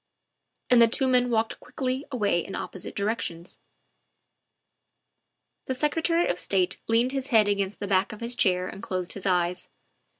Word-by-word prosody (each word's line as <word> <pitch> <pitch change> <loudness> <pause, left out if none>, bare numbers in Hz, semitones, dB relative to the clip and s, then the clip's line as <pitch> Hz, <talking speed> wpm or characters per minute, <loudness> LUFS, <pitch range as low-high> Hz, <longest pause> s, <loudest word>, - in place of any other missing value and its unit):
And 245 -1 +7
the 230 - +8
two 260 +3 0
men 250 -1 +3
walked 225 -1 0
quickly 260 +2 -3
away 205 -9 +1
in 195 - -7
opposite 185 - -6
directions. 200 -5 -3 2.1
The 260 - -2
Secretary 325 +5 +1
of 175 - 0
State 185 -2 0
leaned 230 +3 +2
his 270 -1 -2
head 220 -6 +4
against 200 -1 -1
the 205 - -3
back 190 +1 +2
of 215 - -9
his 235 +1 -1
chair 185 -5 +2
and 195 - -8
closed 185 -1 -2
his 200 -1 -4
eyes. 180 -1 0
215 Hz, 160 wpm, -26 LUFS, 185-250 Hz, 2.1 s, the